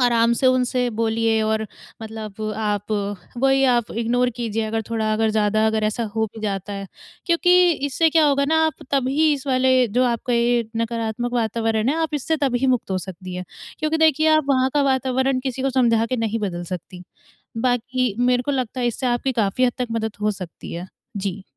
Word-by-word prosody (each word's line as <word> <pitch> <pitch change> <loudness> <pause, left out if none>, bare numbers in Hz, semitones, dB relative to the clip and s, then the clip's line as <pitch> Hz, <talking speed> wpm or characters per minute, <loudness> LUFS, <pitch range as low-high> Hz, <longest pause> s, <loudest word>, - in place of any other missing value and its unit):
आराम 235 -1 +3
से 265 - +3
उनसे 250 -1 +2
बोलिए 225 0 +1
और 220 0 0 0.4
मतलब 220 -2 -8 0.2
आप 210 -1 -2 0.5
वही 270 +1 +3
आप 240 -3 0
इग्नोर 245 +2 +1
कीजिए 225 -2 -2
अगर 225 +1 -2
थोड़ा 220 -1 0
अगर 220 0 +1
ज़्यादा 215 0 +2
अगर 220 0 +1
ऐसा 215 +2 -1
हो 220 0 +1
भी 220 - -9
जाता 200 -1 -3
है 195 0 -5 0.4
क्योंकि 355 +1 +4 0.2
इससे 305 +4 +2
क्या 320 0 +4
होगा 280 -1 +2
ना 320 - +3
आप 315 - -5
तभी 280 +3 +2
इस 280 -1 -8
वाले 260 -1 +3
जो 245 +5 +2
आपका 245 0 -1
ये 235 0 +2
नकारात्मक 230 +1 -2
वातावरण 225 -1 0
है, 305 - -1
आप 320 -2 -1
इससे 315 +3 0
तभी 265 -3 0
मुक्त 250 -6 0
हो 190 - 0
सकती 185 0 -8
है 180 0 -5 0.3
क्योंकि 310 +1 0
देखिए 315 -1 +4
आप 310 - +1
वहाँ 260 -1 +2
का 290 - +3
वातावरण 265 -1 +1
किसी 260 -1 -3
को 270 - +1
समझा 235 -3 +2
के 255 - -2
नहीं 225 -1 -1
बदल 175 -4 -3
सकती। 180 +1 -7 0.6
बाकी 245 0 0
मेरे 245 0 +2
को 285 - -1
लगता 255 -2 -2
है 240 - +2
इससे 240 +2 -2
आपकी 240 +2 0
काफ़ी 210 +5 +1
हद 245 - 0
तक 250 - -1
मदद 220 -1 -2
हो 210 0 +2
सकती 170 -3 -8
है। 175 +2 -6 0.3
जी। 195 0 -4
235 Hz, 200 wpm, -22 LUFS, 220-260 Hz, 0.6 s, क्योंकि